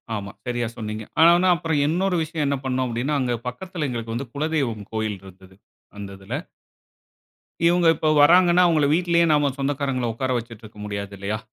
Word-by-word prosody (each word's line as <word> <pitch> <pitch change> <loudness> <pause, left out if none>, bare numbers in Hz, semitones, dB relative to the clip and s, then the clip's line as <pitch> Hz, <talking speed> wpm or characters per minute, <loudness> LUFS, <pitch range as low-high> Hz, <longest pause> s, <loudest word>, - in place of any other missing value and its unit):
ஆமா. 100 -2 -5 0.2
சரியா 120 -1 -1
சொன்னீங்க. 110 -1 -5 0.2
ஆனாவுன்னா, 175 +3 +6
அப்புறம் 160 -4 -1
இன்னொரு 180 +3 0
விஷயம், 155 -1 -3
என்ன 140 - 0
பண்னோம் 130 0 0
அப்டின்னா, 120 +6 -2
அங்க 125 -2 0
பக்கத்தில 170 +3 -4
எங்களுக்கு 115 -2 -4
வந்து, 125 +1 -5
குலதெய்வம் 140 -9 -2
கோயில் 110 -3 -2
இருந்தது. 95 0 -15 0.4
அந்த 100 -1 -7
இதில. 95 - -8 1.3
இவுங்க 175 0 +3
இப்போ 155 +1 0
வராங்கன்னா, 175 +3 +6
அவுங்கள 155 -4 +3
வீட்டிலயே, 170 0 +2
நம்ம 145 -2 +2
சொந்தக்காரங்கள 135 -4 -1
உக்கார 130 +3 -2
வச்சிட்ருக்க 115 -2 -9
முடியாது 100 -1 -5
இல்லையா? 105 +2 -3
130 Hz, 155 wpm, -23 LUFS, 110-160 Hz, 1.3 s, ஆனாவுன்னா